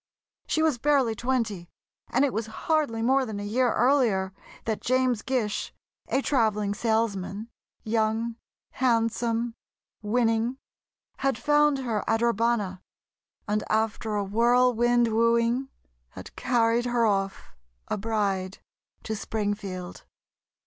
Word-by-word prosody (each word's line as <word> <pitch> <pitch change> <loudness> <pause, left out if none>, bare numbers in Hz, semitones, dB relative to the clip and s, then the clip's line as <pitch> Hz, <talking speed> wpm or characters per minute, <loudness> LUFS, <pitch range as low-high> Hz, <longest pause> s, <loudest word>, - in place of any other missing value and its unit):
She 315 - +1
was 305 -6 +2
barely 275 -4 +3
twenty, 220 -7 -2 0.4
and 265 +4 +3
it 275 - -1
was 225 +1 -2 0.2
hardly 295 -8 +1
more 265 +3 +3
than 215 -5 -5
a - - -5
year 240 +4 +1
earlier 230 -8 +2 0.3
that 220 -2 -2
James 255 -2 +1
Gish, 240 -5 -2 0.3
a 270 - 0
travelling 215 -6 +1
salesman—young, 220 +1 -2 0.4
handsome, 230 -1 0 0.5
winning—had 230 +3 -2
found 295 0 +3
her 235 -6 -2
at 225 +1 +1
Urbana, 230 -5 +1 0.7
and 210 +1 0
after 220 0 0
a 205 - 0
whirlwind 240 +2 +3
wooing, 230 +3 +2 0.4
had - - -11
carried 235 0 +2
her 240 -1 +2
off, 195 -2 -1 0.3
a - - -1
bride, 200 -3 -1 0.5
to 220 - -3
Springfield. 205 -4 -4
230 Hz, 110 wpm, -26 LUFS, 210-245 Hz, 0.7 s, barely